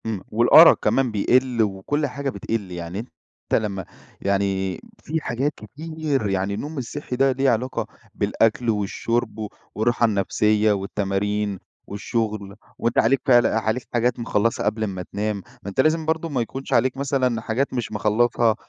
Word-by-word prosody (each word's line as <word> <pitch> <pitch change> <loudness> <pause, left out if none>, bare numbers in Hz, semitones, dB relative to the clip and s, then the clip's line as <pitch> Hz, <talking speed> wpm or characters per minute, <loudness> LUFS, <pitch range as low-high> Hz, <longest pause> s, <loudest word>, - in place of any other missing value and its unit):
إمم. 110 -4 -3
والأرَق 120 +9 +8
كمان 135 -3 +2
بيقِل 125 +3 +2
وكل 105 +10 -1
حاجة 140 +2 -3
بتقِل. 100 -3 -4
يعني 85 +2 -5
أنت 110 -1 -4
لمّا 100 -4 -4 0.4
يعني 95 -2 0 0.2
في 160 +1 -2
حاجات 135 +3 -1
كتير 145 -1 -3
يعني 95 +1 -1
النوم 145 +9 -5
الصحّي 130 +1 -4
ده 135 +1 +3
له 135 +1 +2
علاقة 125 +2 -1 0.3
بالأكل 115 +2 +1
والشُرب 110 +2 -1
و 105 -1 -4 0.3
والراحة 120 +2 +2
النفسية 105 +1 +2
والتمارين 100 0 -1 0.3
والشغل، 105 -1 -3 0.2
وأنت 115 0 -1
عليك 125 +3 +3
فعل 120 -3 +6
عليك 110 +2 -1
حاجات 120 +1 +1
مخلّصها 115 -1 0
قبل 110 +1 0
أمَّا 95 -3 -3
تنام، 105 +1 -1 0.3
ما 100 - -5
أنت 100 - -7
لازم 155 +2 +1
برضه 160 +1 -1
ما 130 -5 0
يكونش 135 +4 -5
عليك 130 +2 +2
مثلًا 130 -4 0
حاجات 120 +6 -1
مش 120 -4 -3
مخلّصها، 110 +2 +2
115 Hz, 150 wpm, -23 LUFS, 105-130 Hz, 0.4 s, والأرَق